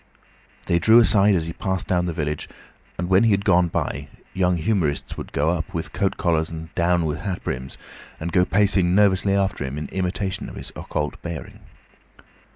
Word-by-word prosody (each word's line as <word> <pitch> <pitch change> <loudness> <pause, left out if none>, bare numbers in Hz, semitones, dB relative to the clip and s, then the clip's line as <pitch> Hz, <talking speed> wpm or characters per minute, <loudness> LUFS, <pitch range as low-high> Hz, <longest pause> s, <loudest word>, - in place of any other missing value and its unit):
They 85 - +2
drew 110 +7 +6
aside 105 -3 +6
as 80 -3 0
he 85 - -5
passed 95 0 -2
down 90 -1 +1
the - - -1
village, 75 -2 -3 0.5
and 90 - -2
when 95 +3 +4
he - - +4
had 100 -1 +1
gone 90 -2 +4
by, 70 -3 -3 0.3
young 90 -1 +1
humourists 80 -4 -1
would - - -7
up 80 +4 0
with 80 - -4
coat 100 -2 0
collars 80 -3 +1
and 80 0 -8
down 85 0 +2
with 75 -1 -2
hat 95 -3 -4
brims, 65 +1 -5 0.4
and 85 +2 -4
go 90 +1 +4
pacing 95 -2 +2
nervously 100 -1 +3
after 95 -6 0
him 65 +2 -5
in 75 - -4
imitation 95 +1 -3
of - - -11
his - - -7
occult 75 0 -4
bearing. 85 -3 -7
90 Hz, 185 wpm, -23 LUFS, 80-95 Hz, 0.5 s, drew